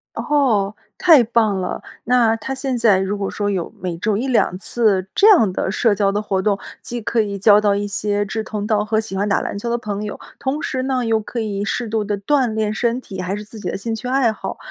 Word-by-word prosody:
哦， 225 -9 +1 0.2
太 325 -8 +6
棒 220 -4 +1
了！ 180 - -3 0.2
那 235 -2 +3
它 225 - -9
他 270 - -1
现 265 -1 -2
在 220 -5 +4
如 190 +2 -1
果 195 -1 -2
说 205 -1 -2
有 185 -4 -2
每 180 -2 -3
周 210 +3 0
一 240 +6 -2
两 240 -8 +2
次 200 -3 +1
这 410 - +6
样 270 - +6
的 190 - -2
社 215 +1 +2
交 200 -1 +2
的 205 +1 -1
活 195 -2 -1
动， 200 0 +1 0.2
既 240 0 -4
可 230 +2 0
以 200 -2 -2
交 205 +1 +6
到 205 -1 +2
一 205 0 -2
些 205 0 -1
志 220 +2 -3
同 210 -1 -4
道 210 -1 +2
合， 215 +1 0
喜 215 -3 -3
欢 200 +2 0
打 200 - +2
篮 - - -4
球 235 - -4
的 235 - +1
朋 210 -3 -4
友， 210 - -6 0.2
同 275 +3 -2
时 260 - -2
呢， 260 -2 0
又 225 -1 +2
可 225 +3 -7
以 205 -3 -3
适 240 +3 -2
度 220 0 0
地 205 0 -2
锻 255 +4 +1
炼 215 -1 0
身 235 +1 0
体， 190 -7 -8
还 185 +2 -2
是 210 - -7
自 215 +1 -10
己 - - -4
的 - - -2
兴 225 +3 -3
趣 225 +3 -5
爱 255 -3 +2
好。 215 - -6
215 Hz, 275 characters per minute, -20 LUFS, 200-235 Hz, 0.2 s, 太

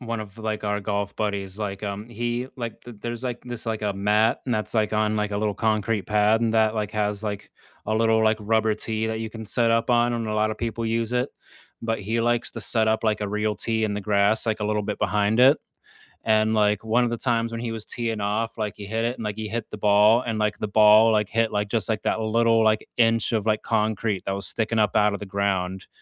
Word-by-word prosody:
one 115 -2 -4
of, 105 0 -10
like, 110 -1 -3
our 105 0 -1
golf 100 0 -2
buddies, 100 -3 -3
like, 100 -2 -4
um, 100 +2 -5
he, 120 +2 -3
like 115 -3 -6
th 120 -3 -11
there's, 120 +1 -5
like, 125 -2 -3
this 120 -2 -7
like, 110 -1 -2
a 105 -1 0
mat, 105 +4 +2
and 125 - -2
that's, 110 +1 -3
like, 110 -2 +1
on, 110 0 +1
like, 105 -1 -1
a 100 - -2
little 105 -1 0
concrete 110 0 0
pad, 105 +2 +2
and 115 -1 +1
that, 110 -1 +3
like, 105 -1 -2
has, 105 -1 -2
like, 105 -2 -5 0.4
a 110 - 0
little, 110 0 +3
like, 110 0 +3
rubber 110 +1 +1
tee 110 +1 -3
that 110 0 -3
you 110 -1 -4
can 110 0 -8
set 115 +2 +1
up 115 0 +1
on, 120 0 +3
and 115 -1 -2
a 110 - -2
lotta 110 0 +1
people 115 0 -3
use 115 +1 -1
it, 125 +2 +1 0.5
but 115 -1 -2
he 110 +4 -1
likes 120 +1 0
to - - -6
set 110 -2 0
up, 110 +1 0
like, 110 -1 +1
a 105 - -2
real 105 +1 -1
tee 110 +2 -1
in 105 -1 -1
the 105 - -3
grass, 105 +2 +1
like, 110 -1 0
a - - -1
little 105 0 0
bit - - -4
behind 105 +2 +1
it, 135 +4 +7 0.7
and, 110 0 +3
like, 105 -1 +2
one 115 +3 +2
of - - 0
the 120 - -2
times 115 -1 0
when 115 - -4
he 120 -1 -3
was 110 -1 -6
teeing 115 -2 -3
off, 105 +3 -2
like, 105 -2 -2
he 105 - -8
hit 110 +3 -2
it, 120 +1 -1
and, 115 - -7
like, 105 -1 -4
he 110 -1 -4
hit 115 +2 -4
the - - -6
ball, 105 +3 +5
and, 110 -2 -1
like, 105 -1 0
the 105 - -2
ball, 110 +2 +6
like, 105 -2 +1
hit, 115 0 +1
like, 105 0 -1
just, 115 0 -1
like, 110 -2 -1
that - - 0
little, 115 +1 +2
like, 110 -1 +2
inch 115 -1 +3
of, 110 -3 0
like, 110 -1 +1
concrete 110 -3 -1
that 95 - -1
was 100 0 -4
sticking 110 0 -1
up 105 -2 +2
out 105 0 +3
of 100 - -4
the - - -5
ground, 95 -1 -2
110 Hz, 260 wpm, -24 LUFS, 105-115 Hz, 0.7 s, it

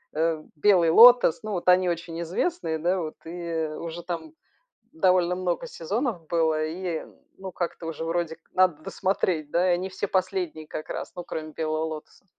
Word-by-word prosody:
э, 160 -1 0
"Белый 175 0 +4
лотос". 240 -2 +8
Ну 215 - -4
вот 180 -3 -3
они 180 0 +5
очень 170 -1 -4
известные, 170 - -1
да 180 +4 +1
вот, 155 -2 -5
и 165 -1 -3
уже 170 +1 -6
там 180 - -5 0.6
довольно 180 - +3
много 185 +6 -2
сезонов 210 - -3
было, 160 -2 +1
и 170 0 -4 0.3
ну 190 -1 -7
как-то 175 -1 -4
уже, 165 0 -4
вроде 165 -1 -1
как, - - -39
надо 180 -5 +3
досмотреть, 180 -6 -1
да? 175 - +2
Они 180 +1 +1
все 190 +2 -3
последние 180 -5 -2
как 155 - -6
раз, - - -5
ну, 175 - -5
кроме 155 -2 -5
"Белого 155 0 -1
Лотоса". 155 +4 -8
175 Hz, 170 wpm, -26 LUFS, 160-185 Hz, 0.6 s, лотос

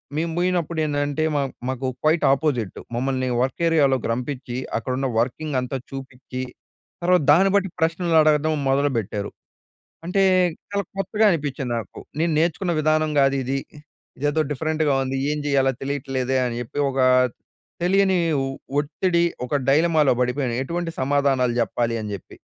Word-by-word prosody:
మేము 165 +2 -1
పోయినప్పుడు 175 -2 0
ఏందంటే 145 0 -1
మా 145 - +2 0.3
మాకు 130 0 -2
క్వైట్ 155 +2 +3
ఆపోసజిట్. 135 -7 0 0.2
మమ్మల్ని 130 +1 -1
వర్క్ 130 +5 -2
ఏరియాలోకి 140 -6 +2
రంపించి, 125 0 -4 0.2
అక్కడున్న 130 +4 -2
వర్కింగ్ 135 +5 -2
అంతా 125 +1 -3
చూపించి, 130 -1 -7 0.6
తర్వాత 180 0 +4
దాన్ని 195 +3 +5
బట్టి 195 -1 +2
ప్రశ్నలు 165 +1 +1
అడగటం 155 0 +3
మొదలుపెట్టారు. 125 -7 0 0.7
అంటే 185 +3 +1 0.5
చాలా 200 0 -1
కొత్తగా 195 +3 0
అనిపించింది 145 -6 -2
నాకు. 110 - -8 0.2
నేను 165 +1 +1
నేర్చుకున్న 170 +2 +1
విధానం 155 0 +2
కాదిది. 135 -1 +1 0.6
ఇదేదో 145 +3 +1
డిఫరెంట్‌గా 155 0 0
ఉంది. 130 +1 -2
ఏం 150 - -1
చేయాలో 135 -2 +2
తెలియట్లేదే 135 -2 -2
అని 120 -1 -3
చెప్పి 120 +3 -6
ఒక 135 - -4 0.8
తెలియని 190 +1 +3 0.2
ఒ - - -1 0.3
ఒత్తిడి 170 +4 +1 0.2
ఒక 125 - -3
డైలమాలో 155 0 +4
పడిపోయాను. 125 0 0
ఎటువంటి 170 +4 -3
సమాధానాలు 135 -2 +2
జెప్పాలి 115 0 0
అని 105 -1 -5
జెప్పి. 100 - -10
145 Hz, 135 wpm, -23 LUFS, 130-160 Hz, 0.8 s, దాన్ని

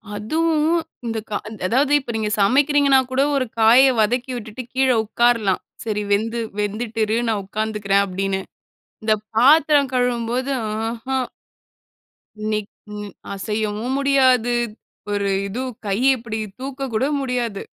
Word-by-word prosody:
அதுவும் 315 +8 +1 0.3
இந்த 225 - -2
கா 205 - -1 0.3
அதாவது 265 +7 +2
இப்ப 260 - -6
நீங்க 215 -1 -1
சமைக்கிறீங்கன்னா 275 +5 +4
கூட 260 +1 +2
ஒரு 265 -2 +1
காயை 245 +5 +7
வதக்கி 245 +4 0
விட்டுட்டு 235 +1 -7
கீழே 260 0 +3
உட்காரலாம். 225 -3 +2 0.2
சரி 210 -2 -2
வெந்து 225 +3 +1 0.2
வெந்துட்டு 215 +2 -3
இரு 220 +2 0
நான் 215 -2 0
உட்காந்துக்கிறேன் 205 -1 0
அப்படின்னு. 195 0 -2 0.6
இந்த 215 0 +3 0.2
பாத்திரம் 285 +2 +5
கழுவும்போது 245 +1 0 0.2
ஆஹம். 230 +4 -2 1.1
இன்னைக்கும் 210 -1 -5 0.2
அசையவும் 215 +4 -2
முடியாது. 260 -4 +3 0.6
ஒரு 200 -1 0 0.2
இது 235 +7 -4 0.2
கை 195 0 0 0.2
இப்டி 225 -3 -5 0.2
தூக்க 270 +1 -6
கூட 220 +4 +1 0.2
முடியாது. 245 -6 -2
230 Hz, 120 wpm, -21 LUFS, 210-260 Hz, 1.1 s, காயை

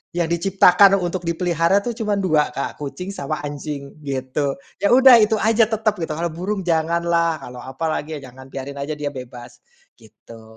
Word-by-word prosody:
yang 170 -2 0
diciptakan 190 +2 +5
untuk 175 0 -2
dipelihara, 170 +2 +1
tuh, 240 - -1
cuma 215 -3 -1
2, 160 -6 +2
Kak, 140 - -4
kucing 180 +6 -6
sama 155 -5 -4
anjing, 145 -1 -6
gitu. 135 +1 -2 0.3
Ya, 200 - +2
udah, 260 -1 +8
itu 215 +1 +3
aja, 225 +1 +4
tetap, 220 -1 0
gitu. 160 -1 -3
Kalau 170 +2 -2
burung 190 +4 -3
janganlah, 170 -1 0
kalau 125 -1 -9
apalagi 155 +3 -4
jangan, 130 0 -12
biarin 140 +1 -6
aja 140 +2 -3
dia 145 -1 -3
bebas, 125 -2 -10 0.4
gitu. 115 +1 -16
165 Hz, 165 wpm, -21 LUFS, 140-190 Hz, 0.4 s, udah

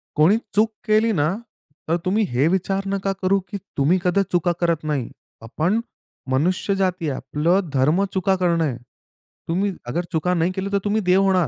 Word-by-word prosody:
कोणी 165 +8 +5 0.2
चूक 220 +2 +4 0.2
केली 215 +1 +3
ना, 150 -6 +1 0.6
तर 170 +2 +2
तुम्ही 210 +4 +2
हे 130 +6 +2
विचार 195 +2 0
नका 195 0 -1
करू 195 +1 +3
की 200 - -3 0.2
तुम्ही 150 +7 +3
कधीच 190 +2 +2
चुका 175 0 +2
करत 170 -2 +1
नाही. 145 -5 -2 0.3
आपण 160 - 0 0.5
मनुष्य 180 +8 +1
जाती 185 -4 0
आहे. 135 - -2
आपलं 160 +7 0
धर्म 150 +8 +3
चुका 190 0 +2
करणं 170 -3 +1
आहे. 130 -6 -1 0.7
तुम्ही 190 +4 0 0.2
अगर 170 +9 -1
चुका 180 +2 0
नाही 170 +1 +1
केल्या 195 +1 -3
तर 200 -1 +1
तुम्ही 210 +1 +1
देव 190 +1 +5
होणार. 185 -4 +3
180 Hz, 180 wpm, -22 LUFS, 160-195 Hz, 0.7 s, कोणी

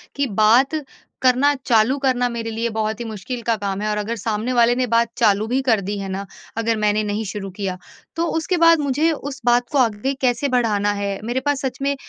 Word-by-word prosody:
कि 280 0 0 0.2
बात 265 +8 +4 0.4
करना 260 +3 +4
चालू 230 +3 +3
करना 250 -2 +2
मेरे 230 -1 -4
लिए 230 +1 -2
बहुत 220 0 -1
ही 235 - -4
मुश्किल 225 +3 -6
का 230 0 +1
काम 200 -1 -3
है 215 - -1
और 210 - -1
अगर 210 +3 -2
सामने 225 +3 -2
वाले 240 0 +4
ने 255 0 +1
बात 230 0 +3
चालू 215 -3 +3
भी 255 +3 0
कर 225 -4 +3
दी 200 +2 -4
है 195 - -4
ना 195 +1 -4 0.3
अगर 225 0 0
मैंने 210 0 +1
नहीं 210 +1 -2
शुरू 195 0 -5
किया। 190 -1 -4 0.4
तो 335 +1 0
उसके 340 +3 0
बाद 335 -1 +6
मुझे 295 +3 +1
उस 285 -3 -5
बात 240 0 +3
को 290 - 0
आगे 240 +1 +1
कैसे 250 +1 +1
बढ़ाना 215 -5 +1
है, 200 -1 -3
मेरे 240 +3 -1
पास 290 -2 0
सच 255 -1 -3
में 280 +1 0
235 Hz, 225 wpm, -21 LUFS, 210-260 Hz, 0.4 s, बाद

